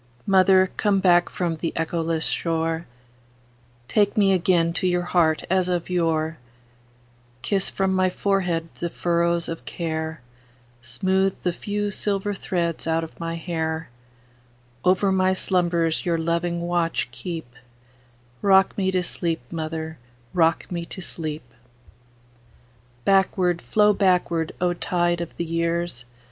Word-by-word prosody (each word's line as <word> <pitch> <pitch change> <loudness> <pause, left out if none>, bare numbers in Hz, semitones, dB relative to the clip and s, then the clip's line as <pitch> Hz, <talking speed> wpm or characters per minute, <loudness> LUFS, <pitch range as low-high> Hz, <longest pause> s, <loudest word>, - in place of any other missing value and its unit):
Mother, 190 -1 +5
come 205 -2 +2
back 175 -2 +4
from 170 -3 -2
the 165 +1 -2
echoless 165 0 -1
shore, 165 0 -1 1.0
Take 205 - +2
me 195 -2 +5
again 170 -2 +2
to 185 - +1
your 180 0 +1
heart 165 -3 +2
as 185 0 +1
of 180 0 -2
yore; 165 -2 0 1.0
Kiss 195 -2 +1
from 190 -1 0
my 185 0 +3
forehead 180 -4 0
the 170 - -2
furrows 170 0 0
of 165 - -5
care, 160 -2 -4 0.6
Smooth 190 +11 0
the 180 - +1
few 205 +2 -3
silver 205 0 -1
threads 170 -4 -2
out 165 0 +1
of 160 - -10
my 165 0 -3
hair; 160 -2 -3 0.9
Over 190 +2 +3
my 185 0 +3
slumbers 175 -3 +1
your 170 -2 +1
loving 170 +1 -1
watch 170 -4 0
keep;—Rock 125 +4 -2
me 190 -1 +1
to 185 -1 +1
sleep, 170 -4 -2
mother,—rock 160 -2 -2
me 170 -1 -2
to 185 - -7
sleep! 155 -3 -4 1.6
Backward, 185 -2 +2
flow 210 -1 +3
backward, 180 -4 +1
O 180 0 +1
tide 175 0 0
of 170 - -7
the 170 - -2
years! 165 -5 -2
170 Hz, 125 wpm, -24 LUFS, 160-185 Hz, 1.6 s, Mother